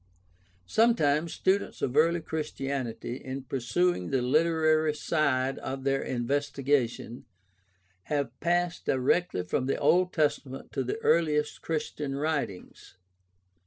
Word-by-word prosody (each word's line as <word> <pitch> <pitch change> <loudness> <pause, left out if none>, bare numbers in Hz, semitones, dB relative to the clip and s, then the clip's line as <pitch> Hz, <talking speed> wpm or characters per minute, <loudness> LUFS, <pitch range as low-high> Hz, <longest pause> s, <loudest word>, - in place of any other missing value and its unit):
Sometimes 165 - +2
students 195 +2 0
of 125 - -1
early 165 +3 +4
Christianity, 135 -6 -4
in 135 0 -6
pursuing 135 - 0
the 130 -2 +1
literary 155 +2 +3
side 135 -4 0
of 135 0 -5
their 135 0 +1
investigation, 135 -1 -1 0.8
have 140 -5 -1
passed 175 0 0
directly 130 - +1
from 125 +8 -1
the 135 - 0
Old 180 +5 +3
Testament 145 -4 -1
to 135 - -1
the 125 - -3
earliest 150 -3 +2
Christian 150 -3 -3
writings. 140 - -4
145 Hz, 110 wpm, -28 LUFS, 130-160 Hz, 0.8 s, early